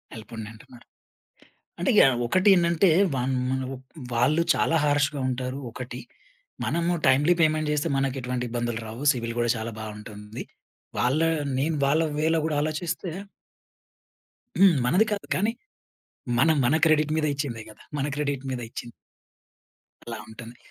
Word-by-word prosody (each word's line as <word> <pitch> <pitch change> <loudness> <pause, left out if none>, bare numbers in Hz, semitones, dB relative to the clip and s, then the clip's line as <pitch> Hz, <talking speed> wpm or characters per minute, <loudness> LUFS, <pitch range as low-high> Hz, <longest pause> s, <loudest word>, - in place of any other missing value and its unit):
ఎళ్ళిపొండి 110 0 -8
అంటున్నారు. 120 +2 -16 0.9
అంటే - - +1
యాహ్! 130 -2 +6
ఒకటి 185 - +3
ఏంటంటే 170 +1 +3 0.3
వాళ్ళు 130 +1 0
మనకు 130 0 -2 0.4
వాళ్ళు 140 +8 +3
చాలా 165 - +1
హార్ష్‌గా 145 -1 +1
ఉంటారు 130 +1 -3
ఒకటి. 125 +1 -7 0.6
మనము 170 +9 0
టైమ్‌లీ 145 +6 +5
పేమెంట్ 155 -1 +2
చేస్తే 150 -1 0
మనకు 135 -1 0
ఎటువంటి 125 0 -3
ఇబ్బందులు 120 -1 -2
రావు. 115 +5 -7
సిబిల్ 115 -2 -4
కూడా 120 0 +1
చాలా 110 +1 -4
బావుంటుంది. 105 +1 -8 0.5
వాళ్ళ 130 +5 +2 0.4
నేను 155 +4 0
వాళ్ళ 155 +4 +3 0.2
వే‌లో 160 +1 +2
కూడా 150 -2 -1
ఆలోచిస్తే 165 +3 -3 1.5
హ్మ్, 190 -3 +7
మనది 180 - +4
కాదు. 205 - -2
కానీ 210 +4 +1 0.9
మనం 160 +4 +4
మన 125 - +3
క్రెడిట్ 155 -1 +3
మీద 155 -1 +1
ఇచ్చిందే 135 -6 -4
గదా! 105 - -16 0.2
మన 140 - 0
క్రెడిట్ 140 -2 -2
మీద 125 -2 -3
ఇచ్చిం 120 0 -7 1.2
అలా 115 -2 -5
ఉంటుంది. 115 +1 -11
135 Hz, 135 wpm, -26 LUFS, 120-155 Hz, 1.5 s, హ్మ్